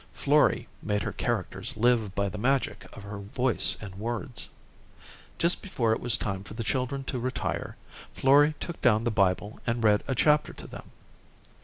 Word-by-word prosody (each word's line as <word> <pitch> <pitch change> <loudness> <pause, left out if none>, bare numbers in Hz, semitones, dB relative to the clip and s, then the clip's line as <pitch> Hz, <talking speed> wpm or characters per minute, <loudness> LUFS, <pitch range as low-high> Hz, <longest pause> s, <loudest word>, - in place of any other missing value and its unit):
Florrie - - +2
made 105 -1 -1
her - - -2
characters - - -3
live 115 -3 +2
by 100 0 +1
the 100 +1 -6
magic 135 +4 0
of 100 - -9
her 100 0 -7
voice 120 +5 +1
and 100 -4 -8
words. 115 +4 -4 0.9
Just 170 +1 +2
before 120 - 0
it - - -2
was 120 -2 +5
time 95 -3 -3
for 100 +1 -10
the 115 - -3
children 130 +6 -1
to 130 -1 -4
retire, 130 +2 -3 0.4
Florrie 145 +3 +5
took 170 - -6
down 110 -4 +4
the 120 - 0
Bible 100 0 0
and 115 0 0
read 105 -1 +4
a 135 - -1
chapter 150 +4 +3
to - - -11
them. - - -10
115 Hz, 175 wpm, -28 LUFS, 105-130 Hz, 0.9 s, was